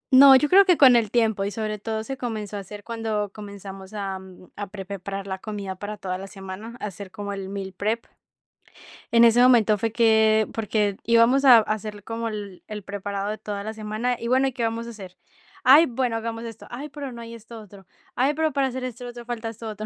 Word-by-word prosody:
No, 270 0 +10
yo 295 +3 +4
creo 390 +5 +7
que 360 -4 +4
con 255 -4 +8
el 225 -3 +2
tiempo, 220 -4 +1
y 200 - -1
sobre 215 0 -4
todo, 220 0 -3
se 270 +3 -6
comenzó 215 -4 -4
a - - -3
hacer 205 +1 -10
cuando 220 -3 -3
comenzamos 200 -1 -10
a 195 -2 -4 0.4
a 205 0 -5
pre 195 -1 -8
preparar 195 0 -6
la 190 -1 -5
comida 200 -3 -5
para 205 +3 -6
toda 185 -2 -4
la 195 - -7
semana, 195 +4 -9
a - - -4
hacer 195 0 -7
como 205 0 -6
el 195 -1 -6
meal 195 -1 -5
prep. 220 +3 -1 1.1
En 235 0 +7
ese 235 +2 +6
momento 225 -4 +5
fue 225 +2 -1
que, 220 -1 +4
porque 210 -2 0
íbamos 235 +4 +4
a 245 -3 +10
a - - +7
hacer 215 -1 -4
como 230 +1 -4
el 205 -4 -7
el 210 -1 -6
preparado 200 0 -4
de 215 - -3
toda 200 -1 -5
la 220 +1 -5
semana, 220 +3 -2
y 235 - -4
bueno: 260 +2 +3
"¿Y 265 - -3
qué 240 -2 -3
vamos 230 +1 -2
a - - -6
hacer?". 190 -5 -11 0.5
"Ay, 285 +6 +8
bueno, 245 -1 -1
hagamos 225 0 -4
esto". 225 -1 -9
"Ay, 280 +5 -6
pero 280 -2 -7
no 235 -1 -9
hay 230 0 -9
esto 230 0 -11
otro". 200 -2 -15 0.3
"Ay, 270 +4 +2
pero, 315 0 0
para 275 -1 +2
hacer 255 0 -5
esto 245 -1 -6
otro, 240 0 -8
falta 235 -1 -4
esto 225 0 -8
otro". 215 0 -6
220 Hz, 230 wpm, -24 LUFS, 200-235 Hz, 1.1 s, No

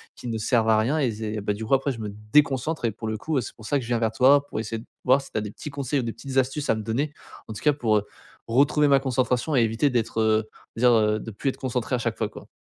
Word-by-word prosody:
qui - - -9
ne 115 -1 -2
servent 115 0 +2
à 110 - +5
rien 125 +8 +1
et 130 -5 +1
c'est 110 -1 -4
ben, 105 0 -1
du 110 - -6
coup, 125 - -1
après 135 +1 0
je 120 - -7
me 105 -2 -4 0.2
déconcentre 145 0 +2
et 115 - +1
pour 110 +2 -7
le 110 0 -2
coup, 155 +6 -2
heu, - - +2
c'est - - -8
pour 110 - -13
ça 145 - +2
que 130 - -3
je - - -8
viens 120 -1 0
vers 110 -1 +1
toi, 140 +5 +5
pour - - -4
essayer 115 0 -4
de 115 - -12 0.2
voir 130 +2 +5
si 135 - -12
tu - - -3
as - - -3
des 105 -1 -5
petits 150 - -8
conseils 140 0 -1
ou - - -1
des 115 -1 -3
petites 135 +3 -6
astuces 135 +3 0
à - - +2
me 110 - -4
donner 140 +7 -2 0.3
en 110 - -6
tout 105 - -8
cas 150 - +4
pour, 115 -7 +1
heu, 105 - -2 0.4
retrouver 145 +5 +3
ma 140 -1 +5
concentration 130 +2 0
et 125 - +5
éviter 115 +5 +2
d'être, 115 -3 -1
heu, 110 0 +2 0.3
on - - -4
va 125 - +6
dire, - - +7
heu, 110 -1 +3
de 115 - -7
plus 110 +6 -2
être - - -5
concentré 125 -1 -2
à - - -2
chaque - - -2
fois, - - -1
quoi. - - -12
120 Hz, 325 wpm, -25 LUFS, 110-135 Hz, 0.4 s, dire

